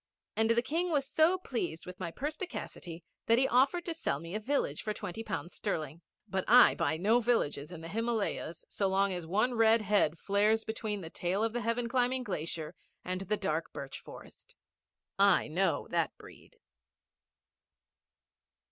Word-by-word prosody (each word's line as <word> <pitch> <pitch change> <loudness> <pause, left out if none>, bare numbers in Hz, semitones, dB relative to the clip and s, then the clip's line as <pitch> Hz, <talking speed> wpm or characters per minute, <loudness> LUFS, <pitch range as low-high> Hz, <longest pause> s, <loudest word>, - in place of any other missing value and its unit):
And 220 0 +3
the 235 +1 +3
King 335 +6 -1
was 285 -4 +1
so 320 +6 +3
pleased 235 - -4
with 180 0 -9
my 175 -3 -3
perspicacity 265 - -6 0.2
that 230 - +5
he 265 +2 +4
offered 275 +8 +3
to 335 - -2
sell 145 - -2
me 165 +3 -8
a 215 - -1
village 280 +6 -1
for 215 -1 -3
twenty 180 +5 -5
pounds 175 -5 -4
sterling. 155 +1 -3 0.3
But 190 -2 -1
I 245 +2 +8
buy 155 +2 0
no 215 +8 +3
villages 180 -11 0
in 170 -2 -8
the 165 - -7
Himalayas 220 -5 -2
so 200 - -1
long 195 0 +2
as 175 -2 -5
one 215 +8 +1
red 225 -1 +4
head 195 -6 +2
flares 210 +4 +2
between 215 -2 -3
the 165 -2 -8
tail 185 +4 -1
of 225 0 0
the 240 - -1
heaven 230 +1 0
climbing 255 +1 +1
glacier 165 -5 -4 0.3
and 185 +1 -2
the 210 +2 -1
dark 165 -5 -2
birch 135 -1 -6
forest. - - -13 0.6
I 200 -2 +5
know 185 +5 0
that - - 0
breed. - - -15
210 Hz, 170 wpm, -31 LUFS, 175-240 Hz, 0.6 s, I